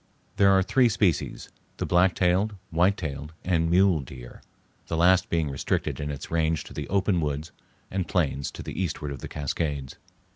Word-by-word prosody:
There 100 Hz, -1 st, +6 dB
are 95 Hz, -1 st, +5 dB
three 125 Hz, +5 st, +3 dB
species, 105 Hz, -7 st, 0 dB, 0.3 s
the -, -, -2 dB
black 90 Hz, 0 st, +3 dB
tailed, 95 Hz, +4 st, +2 dB, 0.2 s
white 90 Hz, +5 st, +3 dB
tailed, 75 Hz, -2 st, -5 dB
and 85 Hz, -2 st, +2 dB
mule 90 Hz, -1 st, +4 dB
deer; 65 Hz, -2 st, -10 dB, 0.5 s
the 80 Hz, -, -2 dB
last 90 Hz, +2 st, +4 dB
being 80 Hz, -2 st, +1 dB
restricted 70 Hz, -, -2 dB
in 75 Hz, -1 st, -3 dB
its 70 Hz, -2 st, -6 dB
range 80 Hz, -2 st, +1 dB
to -, -, -12 dB
the 75 Hz, -1 st, -5 dB
open 95 Hz, -2 st, +2 dB
woods 75 Hz, +1 st, -3 dB, 0.4 s
and 95 Hz, -2 st, -2 dB
plains 70 Hz, -6 st, 0 dB
to -, -, -7 dB
the 95 Hz, -, -4 dB
eastward 75 Hz, -4 st, -3 dB
of 70 Hz, -, -6 dB
the -, -, -6 dB
Cascades. 70 Hz, -2 st, -3 dB
85 Hz, 180 wpm, -26 LUFS, 75-95 Hz, 0.5 s, There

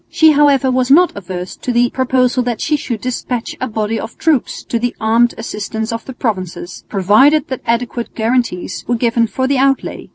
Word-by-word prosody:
She 315 Hz, -1 st, +5 dB
however 280 Hz, -3 st, +3 dB
was 255 Hz, 0 st, +1 dB
not 345 Hz, +6 st, +5 dB
averse 180 Hz, -2 st, -6 dB
to 250 Hz, -, -3 dB
the 240 Hz, 0 st, +2 dB
proposal 255 Hz, -1 st, +1 dB
that 240 Hz, -2 st, -2 dB
she 305 Hz, -, 0 dB
should 240 Hz, -7 st, -4 dB
despatch 250 Hz, -1 st, -3 dB
a 255 Hz, -, -1 dB
body 220 Hz, 0 st, -2 dB
of 225 Hz, -, -8 dB
troops 310 Hz, -6 st, 0 dB
to 235 Hz, -, -2 dB
the 245 Hz, +1 st, -2 dB
armed 230 Hz, +2 st, +2 dB
assistance 220 Hz, 0 st, -4 dB
of 230 Hz, -, -5 dB
the 265 Hz, -, -7 dB
provinces, 185 Hz, -7 st, -4 dB
provided 225 Hz, +10 st, +4 dB
that 260 Hz, -, -4 dB
adequate 235 Hz, 0 st, -2 dB
guarantees 225 Hz, -6 st, -1 dB
were 240 Hz, -, +1 dB
given 230 Hz, 0 st, +1 dB
for 260 Hz, +5 st, -2 dB
the 275 Hz, -1 st, +1 dB
outlay. 270 Hz, 0 st, 0 dB
240 Hz, 190 wpm, -16 LUFS, 220-260 Hz, -, She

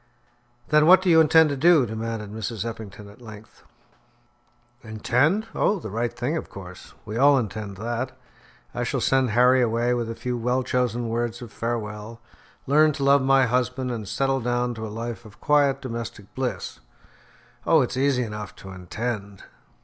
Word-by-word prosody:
"Then 150 Hz, 0 st, +4 dB
what 185 Hz, +1 st, +7 dB
do 180 Hz, -, +3 dB
you 160 Hz, -1 st, +7 dB
intend 160 Hz, 0 st, +5 dB
to -, -, -1 dB
do?" 160 Hz, -1 st, +5 dB
demanded 110 Hz, -1 st, -5 dB
Mrs. 110 Hz, 0 st, -4 dB
Eppington 110 Hz, -3 st, -8 dB
at 105 Hz, +4 st, -16 dB
length. 110 Hz, -2 st, -13 dB, 1.2 s
"Intend! 125 Hz, -, +1 dB
Oh, 210 Hz, -, +1 dB
the 110 Hz, -, -7 dB
right 115 Hz, +2 st, -1 dB
thing 120 Hz, +6 st, -3 dB
of -, -, -6 dB
course. 90 Hz, -2 st, -11 dB
We 105 Hz, -, -5 dB
all 140 Hz, +2 st, +5 dB
intend 105 Hz, -4 st, -4 dB
that. 120 Hz, +4 st, -3 dB, 0.6 s
I -, -, -2 dB
shall -, -, -1 dB
send 130 Hz, -1 st, +2 dB
Harry 125 Hz, +3 st, +4 dB
away 120 Hz, +1 st, +1 dB
with 120 Hz, -2 st, -2 dB
a 115 Hz, -, -5 dB
few 125 Hz, 0 st, -4 dB
well 125 Hz, +2 st, 0 dB
chosen 120 Hz, -2 st, -1 dB
words 120 Hz, 0 st, -2 dB
of 115 Hz, -, -11 dB
farewell, 115 Hz, -1 st, -4 dB, 0.5 s
learn 150 Hz, +2 st, +4 dB
to 140 Hz, -1 st, -4 dB
love 140 Hz, 0 st, +5 dB
my 135 Hz, 0 st, +4 dB
husband 125 Hz, +1 st, -1 dB
and 110 Hz, -4 st, -5 dB
settle 135 Hz, +4 st, 0 dB
down 120 Hz, +1 st, -1 dB
to 110 Hz, -1 st, -6 dB
a -, -, -7 dB
life 115 Hz, +2 st, -6 dB
of 105 Hz, -2 st, -16 dB
quiet 140 Hz, -2 st, +2 dB
domestic 115 Hz, -5 st, -7 dB
bliss. 130 Hz, -, -4 dB, 0.9 s
Oh, 160 Hz, -2 st, +5 dB
it's 125 Hz, -, -4 dB
easy 130 Hz, -1 st, +1 dB
enough 105 Hz, -3 st, -7 dB
to 95 Hz, -, -11 dB
intend!" 100 Hz, +2 st, -5 dB
120 Hz, 170 wpm, -24 LUFS, 110-135 Hz, 1.2 s, what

